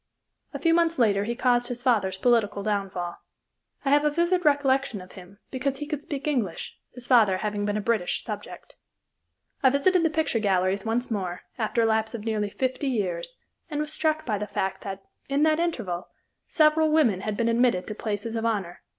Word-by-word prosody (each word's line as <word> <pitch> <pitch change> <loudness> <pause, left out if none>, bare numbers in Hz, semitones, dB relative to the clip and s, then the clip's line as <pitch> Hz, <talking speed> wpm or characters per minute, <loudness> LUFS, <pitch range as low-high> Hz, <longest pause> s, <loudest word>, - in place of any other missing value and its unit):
A - - -5
few 330 -1 +2
months 335 -1 +2
later 205 -4 +3
he 235 +2 -2
caused 245 -1 +2
his 245 -1 -5
father's 205 -7 +2
political 215 -3 +2
downfall. 195 -4 -2 0.7
I 275 - +2
have 290 +1 +5
a 300 - +3
vivid 345 +4 +1
recollection 275 - +2
of 185 0 -12
him 185 +1 -13
because 270 +1 -2
he 295 - -5
could 300 -1 -4
speak 285 0 -4
English, 235 - -2 0.2
his 250 -1 -6
father 220 -7 +5
having 205 0 -2
been 205 0 0
a - - -1
British 215 -5 0
subject. - - -8 0.9
I 265 - +6
visited 340 +7 +3
the 325 - +3
picture 305 -6 0
galleries 195 -1 +1
once 240 +2 -1
more, 185 -4 -3 0.2
after 230 +1 +1
a - - +3
lapse 220 +1 +1
of 220 -2 -7
nearly 215 -2 -1
fifty 260 +5 -2
years, 175 -8 -2 0.3
and 295 -2 -3
was 300 0 -3
struck 310 -1 0
by 210 -4 -1
the 210 - -4
fact 190 -1 -2
that, 195 -1 -6 0.3
in 280 +2 +2
that 310 0 +3
interval, 225 - -2 0.4
several 310 0 +4
women 265 -12 +3
had 210 0 -3
been 230 - +1
admitted 230 -5 +2
to 215 - -5
places 215 +1 -4
of 225 - -2
honor. 200 -6 -2
230 Hz, 195 wpm, -26 LUFS, 205-285 Hz, 0.9 s, I